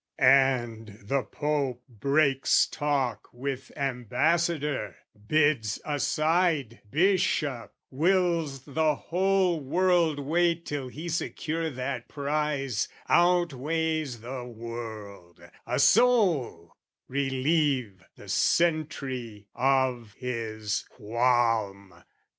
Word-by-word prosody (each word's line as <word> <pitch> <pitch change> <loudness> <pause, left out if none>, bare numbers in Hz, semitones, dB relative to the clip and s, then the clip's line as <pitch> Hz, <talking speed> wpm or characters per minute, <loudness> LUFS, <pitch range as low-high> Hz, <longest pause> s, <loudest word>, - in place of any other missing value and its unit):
And 120 -5 +3
the 135 +7 0
Pope 140 -4 -2
breaks 140 +3 +2
talk 140 -4 -2
with 135 +2 -5
ambassador, 145 - 0 0.3
Bids 145 -9 +2
aside 155 -3 0
bishop, 155 - +1 0.2
wills 165 -3 +1
the 155 +1 +1
whole 185 +1 +1
world 170 +1 +2
wait 170 +4 +1
Till 145 -3 -4
he 155 +7 -8
secure 165 0 -2
that 130 -2 -4
prize, 145 -5 -1 0.2
outweighs 160 -5 +1
the 125 +2 -6
world, 110 -6 -8 0.3
A - - -1
soul, 175 - +3 0.3
relieve 135 - 0
the - - -14
sentry 135 -10 0
of 130 -4 +1
his 110 -4 -3
qualm! 110 -5 0
135 Hz, 85 wpm, -27 LUFS, 120-160 Hz, 0.3 s, And